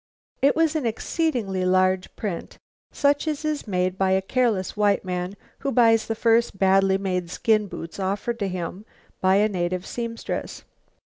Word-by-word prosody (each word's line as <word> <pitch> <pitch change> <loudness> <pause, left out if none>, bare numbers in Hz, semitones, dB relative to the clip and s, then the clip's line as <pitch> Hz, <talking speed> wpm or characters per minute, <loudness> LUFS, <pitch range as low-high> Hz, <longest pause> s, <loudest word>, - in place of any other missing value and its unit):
It 280 - +4
was 320 -1 +2
an 290 -6 0
exceedingly 225 - -1
large 185 0 +2
print; 200 -6 -5 0.3
such 285 +2 +1
as 305 0 -2
is 300 -5 -2
made 185 -1 -1
by 190 -1 +3
a 190 - +2
careless 220 -4 0
white 205 -2 +2
man 180 +1 -3 0.2
who 275 - -2
buys 225 -3 +4
the 225 - -1
first 230 -2 +2
badly 195 0 +4
made 180 -3 -2
skin 215 +3 +1
boots 165 0 -8
offered 200 +5 -2
to 200 - 0
him 180 +1 -5 0.4
by 190 0 +4
a 210 +2 +4
native 180 -2 -2
seamstress. 230 -1 -5
200 Hz, 160 wpm, -24 LUFS, 185-235 Hz, 0.4 s, It